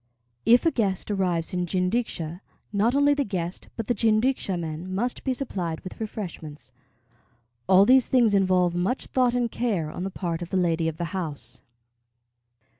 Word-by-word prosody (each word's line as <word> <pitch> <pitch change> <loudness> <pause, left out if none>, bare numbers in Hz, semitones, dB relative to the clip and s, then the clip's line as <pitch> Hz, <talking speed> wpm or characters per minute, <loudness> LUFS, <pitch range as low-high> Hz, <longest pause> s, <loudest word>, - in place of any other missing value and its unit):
If 240 +5 +6
a 330 - +4
guest 200 -5 -1
arrives 180 -3 0
in 180 -1 -1
jinrikisha, 180 -3 -1 0.3
not 220 +5 +2
only 285 +1 +4
the 285 0 +1
guest, 180 -6 -4
but 225 - -3
the 245 - +1
jinrikisha 220 -2 +1
men 165 +2 -5
must 240 +5 -2
be 265 - 0
supplied 185 - -3
with 185 - -9
refreshments. 170 -10 -7 1.0
All 190 +1 +7
these 260 +2 +5
things 240 -5 +3
involve 185 -3 +3
much 185 +9 -1
thought 250 -2 +1
and 240 -2 0
care 195 -11 -1
on 180 - -5
the 195 - -2
part 175 -3 -3
of 175 - -5
the 190 - 0
lady 165 -2 +1
of 160 -1 -3
the 170 +3 -4
house. 150 -10 -4
190 Hz, 170 wpm, -25 LUFS, 170-235 Hz, 1.0 s, All